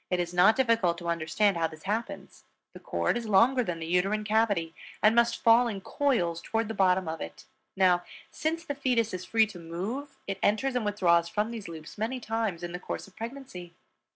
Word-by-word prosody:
It 180 Hz, -, 0 dB
is 175 Hz, 0 st, -2 dB
not 180 Hz, +5 st, +5 dB
difficult 230 Hz, -9 st, +2 dB
to 170 Hz, -1 st, -5 dB
understand 170 Hz, +4 st, +1 dB
how 165 Hz, -1 st, +1 dB
this 155 Hz, -1 st, -13 dB
happens. 215 Hz, +4 st, -4 dB, 0.3 s
The -, -, -11 dB
cord -, -, -1 dB
is 235 Hz, -2 st, -5 dB
longer 235 Hz, +6 st, +4 dB
than 175 Hz, -6 st, -3 dB
the 165 Hz, -, -6 dB
uterine 190 Hz, +5 st, +1 dB
cavity 210 Hz, -6 st, +1 dB, 0.3 s
and 215 Hz, +1 st, +6 dB
must 235 Hz, 0 st, +2 dB
fall 235 Hz, +2 st, +6 dB
in 210 Hz, -4 st, -4 dB
coils 185 Hz, -, 0 dB
toward 225 Hz, +2 st, -2 dB
the -, -, -2 dB
bottom 185 Hz, -3 st, +2 dB
of 160 Hz, 0 st, -4 dB
it. 80 Hz, -6 st, -8 dB, 0.3 s
Now, 180 Hz, -2 st, +4 dB, 0.3 s
since 325 Hz, +1 st, -2 dB
the 285 Hz, -, -3 dB
fetus 250 Hz, -6 st, 0 dB
is 185 Hz, 0 st, -5 dB
free 225 Hz, -1 st, +3 dB
to 205 Hz, -4 st, -10 dB
move 215 Hz, -, -5 dB
it 195 Hz, -1 st, -4 dB
enters 250 Hz, +6 st, +1 dB
and 250 Hz, -, 0 dB
withdraws 170 Hz, -5 st, +2 dB
from 210 Hz, +4 st, -1 dB
these 225 Hz, -4 st, -7 dB
loops, 160 Hz, +2 st, -10 dB
many 235 Hz, +4 st, -2 dB
times, 220 Hz, -7 st, -2 dB
in 175 Hz, -, -4 dB
the 180 Hz, -, -5 dB
course -, -, -6 dB
of 195 Hz, -, -20 dB
pregnancy. 225 Hz, -8 st, -8 dB
205 Hz, 210 wpm, -28 LUFS, 175-230 Hz, 0.3 s, and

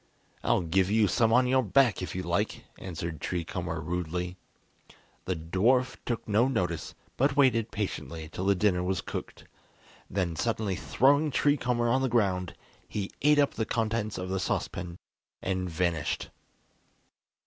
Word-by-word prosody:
"I'll -, -, +3 dB
give 90 Hz, +3 st, +2 dB
you 110 Hz, 0 st, +4 dB
some 115 Hz, +4 st, +2 dB
on 125 Hz, +2 st, +5 dB
your 130 Hz, +1 st, +3 dB
back, 120 Hz, 0 st, +3 dB
if 90 Hz, -, -5 dB
you 95 Hz, -, -2 dB
like," -, -, -1 dB, 0.2 s
answered 85 Hz, -3 st, -5 dB
Tree 90 Hz, -2 st, -2 dB
Comber 85 Hz, -1 st, -4 dB
rudely. 90 Hz, +2 st, -3 dB, 0.9 s
The 95 Hz, +1 st, -1 dB
dwarf 110 Hz, +11 st, +2 dB
took 120 Hz, -2 st, -2 dB
no 110 Hz, +4 st, +3 dB
notice, 90 Hz, -11 st, -2 dB, 0.2 s
but 135 Hz, +2 st, +2 dB
waited 115 Hz, -5 st, +4 dB
patiently 80 Hz, -6 st, -4 dB
till 90 Hz, +3 st, -5 dB
the 100 Hz, -, +4 dB
dinner 90 Hz, -1 st, +2 dB
was 95 Hz, 0 st, 0 dB
cooked, -, -, -6 dB, 0.7 s
then 90 Hz, -3 st, -1 dB
suddenly 110 Hz, +1 st, -1 dB
throwing 140 Hz, -, +3 dB
Tree 145 Hz, +1 st, +3 dB
Comber 125 Hz, -3 st, 0 dB
on 130 Hz, +3 st, +2 dB
the 130 Hz, -, +1 dB
ground, 95 Hz, -6 st, +1 dB, 0.3 s
he 100 Hz, -2 st, -4 dB
ate 150 Hz, +1 st, +5 dB
up 145 Hz, -1 st, +3 dB
the 110 Hz, -, -1 dB
contents 110 Hz, -2 st, -1 dB
of 90 Hz, 0 st, -4 dB
the 95 Hz, 0 st, -1 dB
saucepan 90 Hz, -1 st, -3 dB, 0.5 s
and 95 Hz, -1 st, -1 dB
vanished. 85 Hz, -2 st, -1 dB
95 Hz, 155 wpm, -29 LUFS, 90-120 Hz, 0.9 s, on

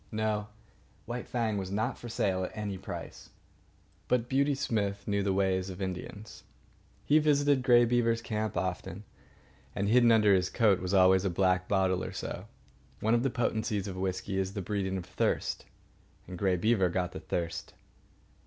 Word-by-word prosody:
No, 105 Hz, -1 st, -1 dB, 0.6 s
White 120 Hz, +1 st, -5 dB
Fang 110 Hz, -4 st, -1 dB
was 95 Hz, -1 st, -5 dB
not 105 Hz, +3 st, -1 dB
for 120 Hz, -, -9 dB
sale 95 Hz, -4 st, 0 dB
at 90 Hz, -, -6 dB
any 105 Hz, -2 st, -3 dB
price. 95 Hz, -, -8 dB, 0.8 s
But 125 Hz, -1 st, +1 dB
Beauty 140 Hz, +2 st, +2 dB
Smith 100 Hz, -7 st, -2 dB
knew 100 Hz, -1 st, +1 dB
the 100 Hz, 0 st, 0 dB
ways 95 Hz, -1 st, +1 dB
of 95 Hz, 0 st, -8 dB
Indians. 95 Hz, +3 st, -6 dB, 0.6 s
He 150 Hz, +2 st, +5 dB
visited 145 Hz, -2 st, +3 dB
Grey 120 Hz, -2 st, +5 dB
Beaver's 115 Hz, -1 st, +1 dB
camp 110 Hz, -3 st, -2 dB
often, 95 Hz, +2 st, -3 dB, 0.7 s
and 100 Hz, -, -1 dB
hidden 120 Hz, 0 st, +5 dB
under 105 Hz, -3 st, +5 dB
his 95 Hz, -1 st, +2 dB
coat 105 Hz, -6 st, +3 dB
was 95 Hz, +1 st, -1 dB
always 95 Hz, 0 st, +5 dB
a 100 Hz, -, +1 dB
black 90 Hz, +1 st, +1 dB
bottle 95 Hz, -2 st, +1 dB
or -, -, -5 dB
so. -, -, -6 dB, 0.5 s
One 110 Hz, +2 st, +1 dB
of 120 Hz, -, +3 dB
the 135 Hz, -, +1 dB
potencies 110 Hz, -4 st, -1 dB
of 95 Hz, -, -5 dB
whisky 95 Hz, +1 st, -2 dB
is 95 Hz, 0 st, -2 dB
the 100 Hz, -, -2 dB
breeding 95 Hz, 0 st, -2 dB
of 90 Hz, -, -6 dB
thirst. -, -, -1 dB, 0.7 s
Grey 95 Hz, +1 st, +1 dB
Beaver 95 Hz, 0 st, +2 dB
got 90 Hz, 0 st, -1 dB
the -, -, -7 dB
thirst. 85 Hz, -1 st, -4 dB
100 Hz, 170 wpm, -30 LUFS, 95-115 Hz, 0.8 s, He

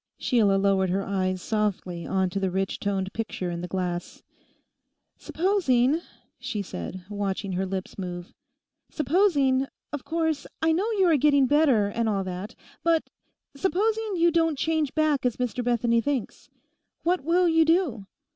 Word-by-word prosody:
Sheila 215 Hz, -6 st, +2 dB
lowered 195 Hz, -1 st, +2 dB
her 195 Hz, +2 st, 0 dB
eyes 185 Hz, -2 st, -1 dB
softly 195 Hz, -5 st, -2 dB
on 190 Hz, -1 st, 0 dB
to 195 Hz, -, -2 dB
the 190 Hz, -1 st, 0 dB
rich 190 Hz, +1 st, -2 dB
toned 195 Hz, -1 st, -2 dB
picture 205 Hz, -5 st, -3 dB
in 170 Hz, 0 st, -4 dB
the 180 Hz, -, -4 dB
glass. 180 Hz, -2 st, -4 dB, 1.0 s
'Supposing,' 320 Hz, -6 st, +1 dB, 0.4 s
she 210 Hz, -3 st, -3 dB
said, 180 Hz, -, -7 dB
watching 200 Hz, -1 st, -3 dB
her 190 Hz, +1 st, -1 dB
lips 190 Hz, +1 st, -5 dB
move, 175 Hz, -1 st, -6 dB, 0.6 s
'supposing—of 285 Hz, -4 st, 0 dB
course, 320 Hz, -3 st, -1 dB
I 320 Hz, 0 st, +2 dB
know 380 Hz, +8 st, +1 dB
you 390 Hz, -3 st, +3 dB
are 330 Hz, -4 st, +4 dB
getting 285 Hz, -1 st, +4 dB
better 275 Hz, -6 st, +4 dB
and 225 Hz, +3 st, -1 dB
all 200 Hz, -2 st, 0 dB
that—but 210 Hz, -, -3 dB, 0.4 s
supposing 420 Hz, +6 st, 0 dB
you 340 Hz, 0 st, +3 dB
don't 325 Hz, -2 st, +2 dB
change 315 Hz, -2 st, 0 dB
back 310 Hz, -3 st, +2 dB
as 250 Hz, -2 st, 0 dB
Mr 250 Hz, 0 st, -2 dB
Bethany 235 Hz, -1 st, +2 dB
thinks, 275 Hz, -3 st, -3 dB, 0.5 s
what 355 Hz, -2 st, +1 dB
will 350 Hz, +3 st, +3 dB
you 325 Hz, -1 st, +4 dB
do? 315 Hz, -, +1 dB
245 Hz, 145 wpm, -26 LUFS, 195-320 Hz, 1.0 s, are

